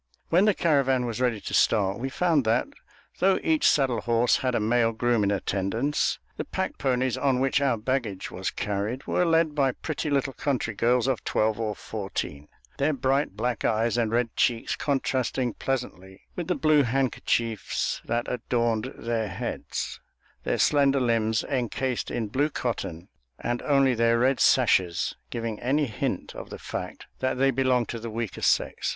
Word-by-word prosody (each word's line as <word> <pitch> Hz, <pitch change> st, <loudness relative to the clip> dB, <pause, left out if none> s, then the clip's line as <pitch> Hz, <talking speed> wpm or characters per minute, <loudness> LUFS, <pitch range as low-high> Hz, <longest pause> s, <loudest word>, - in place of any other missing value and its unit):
When 180 Hz, +5 st, +4 dB
the 210 Hz, -3 st, +3 dB
caravan 135 Hz, -6 st, +2 dB
was 120 Hz, +1 st, -3 dB
ready 120 Hz, -4 st, +1 dB
to -, -, -6 dB
start, 100 Hz, -2 st, +2 dB
we 135 Hz, +2 st, -2 dB
found 160 Hz, -1 st, +2 dB
that, 115 Hz, +3 st, +2 dB, 0.5 s
though 190 Hz, +1 st, +4 dB
each 315 Hz, -3 st, +3 dB
saddle 130 Hz, -5 st, +2 dB
horse 120 Hz, 0 st, +2 dB
had 125 Hz, -2 st, -1 dB
a -, -, +2 dB
male 115 Hz, +1 st, +2 dB
groom 120 Hz, -1 st, +1 dB
in 100 Hz, -, +2 dB
attendance, 100 Hz, +8 st, 0 dB, 0.2 s
the -, -, -2 dB
pack -, -, -4 dB
ponies 130 Hz, -2 st, 0 dB
on 135 Hz, -3 st, +2 dB
which 135 Hz, +2 st, +2 dB
our 135 Hz, -4 st, +2 dB
baggage 110 Hz, -4 st, -2 dB
was 95 Hz, +1 st, -3 dB
carried 105 Hz, +6 st, -3 dB
were 180 Hz, -, +1 dB
led 165 Hz, -2 st, +3 dB
by 135 Hz, -3 st, +2 dB
pretty 155 Hz, +2 st, -4 dB
little 140 Hz, -1 st, 0 dB
country 130 Hz, -4 st, -1 dB
girls 120 Hz, +3 st, +2 dB
of 130 Hz, -3 st, -1 dB
twelve 110 Hz, 0 st, 0 dB
or 110 Hz, -2 st, -2 dB
fourteen, 95 Hz, -8 st, -5 dB, 0.3 s
their 150 Hz, +3 st, +2 dB
bright 135 Hz, -5 st, 0 dB
black 120 Hz, 0 st, -1 dB
eyes 115 Hz, +2 st, +1 dB
and 115 Hz, -2 st, +1 dB
red 115 Hz, 0 st, 0 dB
cheeks 115 Hz, -2 st, +1 dB
contrasting 130 Hz, -3 st, -1 dB
pleasantly 95 Hz, -8 st, -4 dB
with 175 Hz, -2 st, -4 dB
the 180 Hz, -, +1 dB
blue 155 Hz, -2 st, +4 dB
handkerchiefs 120 Hz, -4 st, -1 dB
that 120 Hz, 0 st, -1 dB
adorned 115 Hz, -2 st, -1 dB
their 115 Hz, -2 st, -2 dB
heads; 95 Hz, -1 st, -4 dB, 0.4 s
their -, -, 0 dB
slender 140 Hz, -2 st, +3 dB
limbs 115 Hz, -3 st, +1 dB
encased 130 Hz, -1 st, -2 dB
in 115 Hz, -2 st, -2 dB
blue 140 Hz, +8 st, 0 dB
cotton, 95 Hz, -, -4 dB, 0.3 s
and 120 Hz, 0 st, -2 dB
only 135 Hz, -3 st, +3 dB
their 115 Hz, 0 st, +3 dB
red 130 Hz, +2 st, +2 dB
sashes 85 Hz, -2 st, +3 dB
giving 115 Hz, -, -4 dB
any 145 Hz, +5 st, +1 dB
hint 110 Hz, -5 st, -3 dB
of -, -, -8 dB
the -, -, -7 dB
fact -, -, -6 dB
that 130 Hz, 0 st, -1 dB
they 135 Hz, +1 st, +3 dB
belonged 130 Hz, -2 st, +1 dB
to 115 Hz, -, -5 dB
the 115 Hz, +1 st, -6 dB
weaker 110 Hz, -2 st, -4 dB
sex. -, -, +1 dB
120 Hz, 170 wpm, -26 LUFS, 110-135 Hz, 0.5 s, When